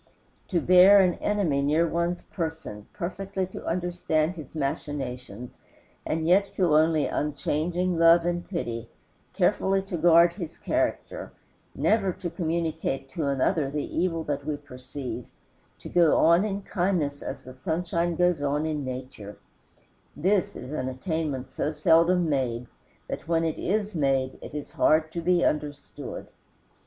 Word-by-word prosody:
To 180 Hz, -, +1 dB
bear 185 Hz, +4 st, +7 dB
an 185 Hz, -2 st, +4 dB
enemy 185 Hz, -10 st, +1 dB
near 155 Hz, +4 st, +2 dB
one's 170 Hz, +2 st, -1 dB
person, 160 Hz, -, -5 dB
perfectly 190 Hz, +2 st, -3 dB
to 185 Hz, -, -9 dB
understand 175 Hz, -2 st, 0 dB
his 155 Hz, -3 st, -10 dB
machinations, 135 Hz, -6 st, -4 dB, 0.5 s
and 160 Hz, +1 st, -1 dB
yet 195 Hz, +3 st, +4 dB
feel 180 Hz, -6 st, +1 dB
only 155 Hz, -1 st, +4 dB
unchanging 165 Hz, +4 st, -1 dB
love 165 Hz, 0 st, +6 dB
and 175 Hz, 0 st, -1 dB
pity, 115 Hz, -, -4 dB, 0.4 s
carefully 195 Hz, 0 st, +2 dB
to 195 Hz, -3 st, -4 dB
guard 170 Hz, +1 st, +6 dB
his 170 Hz, -4 st, -7 dB
character, -, -, -2 dB, 0.4 s
never 210 Hz, -3 st, +2 dB
to 175 Hz, -1 st, -5 dB
communicate 160 Hz, -5 st, -2 dB
to 145 Hz, +2 st, -3 dB
another 140 Hz, +2 st, +1 dB
the 145 Hz, +1 st, -4 dB
evil 165 Hz, -1 st, 0 dB
that 145 Hz, -2 st, -3 dB
we 150 Hz, -1 st, -2 dB
perceive, 125 Hz, -3 st, -7 dB, 0.5 s
to -, -, -10 dB
go 170 Hz, -3 st, +4 dB
on 170 Hz, +5 st, +5 dB
in 200 Hz, -1 st, -3 dB
kindness 175 Hz, -8 st, -1 dB
as -, -, -6 dB
the 130 Hz, -, -10 dB
sunshine 170 Hz, +3 st, -1 dB
goes 180 Hz, -2 st, +2 dB
on 145 Hz, +2 st, 0 dB
in 155 Hz, -2 st, -2 dB
nature 130 Hz, -5 st, -7 dB, 0.8 s
this 185 Hz, +4 st, +1 dB
is 130 Hz, -, -8 dB
an 130 Hz, -4 st, -2 dB
attainment 140 Hz, -1 st, -3 dB
so 150 Hz, -, -2 dB
seldom 165 Hz, +3 st, +3 dB
made 125 Hz, -5 st, -1 dB, 0.4 s
that -, -, -6 dB
when 165 Hz, -1 st, +2 dB
made 160 Hz, -7 st, 0 dB
it -, -, -9 dB
is 150 Hz, -, -6 dB
hard 155 Hz, 0 st, +3 dB
to 170 Hz, -, -4 dB
be 175 Hz, +1 st, +3 dB
understood. 150 Hz, -1 st, -3 dB
160 Hz, 140 wpm, -26 LUFS, 140-175 Hz, 0.8 s, bear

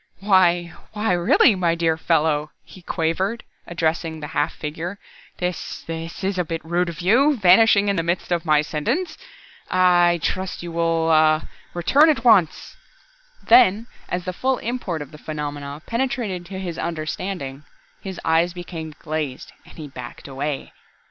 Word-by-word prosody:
"Why, 175 Hz, -3 st, +3 dB, 0.2 s
why 210 Hz, -1 st, 0 dB
really 175 Hz, +5 st, +4 dB
my 175 Hz, -3 st, +1 dB
dear 165 Hz, -1 st, +1 dB
fellow," 155 Hz, -2 st, +1 dB
he 185 Hz, -, -15 dB
quavered, 185 Hz, +7 st, -1 dB, 0.2 s
addressing 165 Hz, -1 st, -2 dB
the 150 Hz, -1 st, -7 dB
half -, -, +1 dB
figure. 160 Hz, +6 st, -6 dB, 0.4 s
"This 180 Hz, 0 st, -4 dB
this 165 Hz, +2 st, -6 dB
is 190 Hz, -1 st, -1 dB
a -, -, +2 dB
bit 165 Hz, 0 st, -5 dB
rude 175 Hz, +2 st, 0 dB
of 170 Hz, +1 st, -7 dB
you, 260 Hz, +10 st, +4 dB
vanishing 205 Hz, +1 st, +5 dB
in 200 Hz, -1 st, +1 dB
the -, -, +2 dB
midst 170 Hz, +2 st, -2 dB
of 170 Hz, -1 st, +1 dB
my 155 Hz, -3 st, +3 dB
sentence. 260 Hz, -, -2 dB, 0.5 s
I 175 Hz, -1 st, +4 dB
I -, -, -1 dB
trust 185 Hz, +2 st, -3 dB
you 170 Hz, -, -6 dB
will 165 Hz, -1 st, +1 dB
ah, 155 Hz, 0 st, +4 dB, 0.3 s
return 280 Hz, -, +4 dB
at 275 Hz, -7 st, +1 dB
once!" 200 Hz, -10 st, +3 dB, 0.7 s
Then, 225 Hz, -, +5 dB, 0.2 s
as 180 Hz, 0 st, -3 dB
the 185 Hz, -, -3 dB
full 260 Hz, +7 st, 0 dB
import 210 Hz, -10 st, -3 dB
of 145 Hz, -, -15 dB
the 150 Hz, -, -12 dB
phenomenon 145 Hz, -1 st, -6 dB
penetrated 230 Hz, -8 st, -2 dB
to 190 Hz, 0 st, -7 dB
his 180 Hz, -3 st, -5 dB
understanding, 155 Hz, -3 st, -4 dB, 0.4 s
his 190 Hz, -3 st, -7 dB
eyes 165 Hz, +2 st, +2 dB
became 165 Hz, -3 st, -7 dB
glazed 155 Hz, -4 st, -4 dB, 0.2 s
and -, -, -16 dB
he 155 Hz, -2 st, -7 dB
backed 125 Hz, -2 st, -10 dB
away. 140 Hz, +1 st, -4 dB
175 Hz, 160 wpm, -22 LUFS, 160-190 Hz, 0.7 s, vanishing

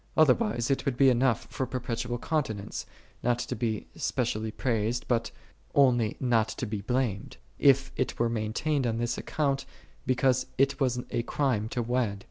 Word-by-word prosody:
Otherwise 120 Hz, -5 st, +3 dB
it 135 Hz, -, +1 dB
would 135 Hz, -4 st, -1 dB
be 135 Hz, -1 st, +6 dB
enough 125 Hz, -2 st, +2 dB
for 130 Hz, -, -2 dB
perpetual 120 Hz, -1 st, -3 dB
continence, 115 Hz, -8 st, -2 dB, 0.3 s
not 120 Hz, -1 st, +2 dB
to -, -, -3 dB
be 110 Hz, -4 st, -2 dB
specially 110 Hz, +1 st, -1 dB
praised, 115 Hz, 0 st, -1 dB
but 115 Hz, -2 st, +1 dB, 0.5 s
only 120 Hz, -6 st, +4 dB
not 115 Hz, -4 st, +2 dB
to -, -, -4 dB
be 105 Hz, -2 st, -4 dB
blamed: 115 Hz, -2 st, -2 dB, 0.2 s
if -, -, +4 dB
it -, -, -1 dB
were 120 Hz, -, +2 dB
maintained 115 Hz, +5 st, 0 dB
on 115 Hz, -1 st, -1 dB
this 120 Hz, +1 st, -1 dB
account, 140 Hz, -3 st, -1 dB, 0.4 s
because 130 Hz, 0 st, +2 dB
it 135 Hz, +2 st, +2 dB
was 125 Hz, -3 st, +1 dB
a -, -, 0 dB
crime 115 Hz, -4 st, 0 dB
to 120 Hz, -, -1 dB
wed. 115 Hz, -4 st, 0 dB
120 Hz, 160 wpm, -28 LUFS, 115-130 Hz, 0.5 s, be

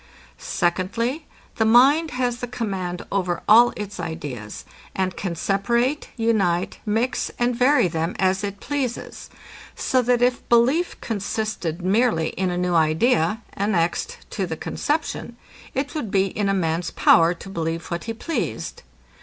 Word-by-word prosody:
Secondly, 230 Hz, -, -1 dB, 0.3 s
The 220 Hz, -, +3 dB
mind 270 Hz, +8 st, +5 dB
has 245 Hz, -2 st, -1 dB
the 245 Hz, -, -4 dB
command 190 Hz, -7 st, -4 dB
over 180 Hz, -3 st, -1 dB
all 235 Hz, +3 st, +7 dB
its 205 Hz, -1 st, -6 dB
ideas, 125 Hz, -9 st, -6 dB, 0.3 s
and 185 Hz, -1 st, -1 dB
can 180 Hz, -4 st, -3 dB
separate, 235 Hz, -, 0 dB
unite, 195 Hz, -7 st, +1 dB
mix, 225 Hz, +5 st, 0 dB
and 240 Hz, 0 st, +1 dB
vary 255 Hz, -2 st, +4 dB
them, 165 Hz, +1 st, -2 dB
as 190 Hz, +1 st, +1 dB
it 200 Hz, 0 st, -4 dB
pleases; 270 Hz, -4 st, -4 dB, 0.5 s
so 255 Hz, -, +1 dB
that 245 Hz, 0 st, +2 dB
if 245 Hz, 0 st, 0 dB
belief 260 Hz, +9 st, +3 dB
consisted 205 Hz, -5 st, -3 dB
merely 195 Hz, -4 st, +2 dB
in 185 Hz, 0 st, -2 dB
a 175 Hz, -, -2 dB
new 180 Hz, 0 st, 0 dB
idea, 165 Hz, +5 st, +2 dB
annexed 200 Hz, -, 0 dB
to -, -, -2 dB
the -, -, -4 dB
conception, 290 Hz, -5 st, -3 dB, 0.4 s
it 270 Hz, +2 st, -2 dB
would 300 Hz, -9 st, -3 dB
be 190 Hz, 0 st, +3 dB
in 200 Hz, +1 st, -1 dB
a -, -, +2 dB
man's 165 Hz, -1 st, 0 dB
power 165 Hz, +1 st, +4 dB
to 175 Hz, -, -11 dB
believe 165 Hz, -3 st, -3 dB
what 170 Hz, 0 st, -3 dB
he 225 Hz, -, -3 dB
pleased. 325 Hz, +8 st, -4 dB
205 Hz, 145 wpm, -23 LUFS, 175-245 Hz, 0.5 s, all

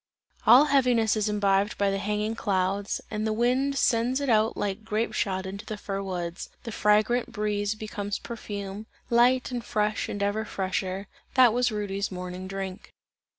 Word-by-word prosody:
All 265 Hz, +4 st, +9 dB
heaviness 250 Hz, -6 st, +3 dB
is 215 Hz, -1 st, 0 dB
imbibed 200 Hz, -1 st, +1 dB
by 200 Hz, -1 st, +2 dB
the 195 Hz, -, -1 dB
hanging 210 Hz, +2 st, -1 dB
clouds, 195 Hz, -2 st, -1 dB
and 215 Hz, 0 st, -1 dB
the -, -, 0 dB
wind 255 Hz, +5 st, +1 dB
sends 245 Hz, +2 st, +2 dB
it 280 Hz, -2 st, -2 dB
out 220 Hz, -1 st, +3 dB
like 205 Hz, +1 st, -2 dB
grape 220 Hz, +1 st, -1 dB
shot 190 Hz, -2 st, -1 dB
into 200 Hz, +3 st, -6 dB
the 215 Hz, -1 st, -6 dB
fir 195 Hz, -1 st, -4 dB
woods; 175 Hz, -2 st, -4 dB
the 230 Hz, -, -6 dB
fragrant 215 Hz, +4 st, +2 dB
breeze 210 Hz, -2 st, -1 dB
becomes 210 Hz, -1 st, -4 dB
perfume, 205 Hz, -2 st, -6 dB, 0.2 s
light 250 Hz, +2 st, +4 dB
and 245 Hz, -2 st, -3 dB
fresh 210 Hz, -2 st, -1 dB
and 205 Hz, -, -2 dB
ever 205 Hz, +2 st, 0 dB
fresher 190 Hz, -1 st, -3 dB, 0.3 s
that 250 Hz, -4 st, +7 dB
was 245 Hz, 0 st, +2 dB
Rudy's 200 Hz, -2 st, -2 dB
morning 180 Hz, 0 st, -6 dB
drink. 195 Hz, 0 st, -6 dB
210 Hz, 165 wpm, -27 LUFS, 195-230 Hz, 0.3 s, All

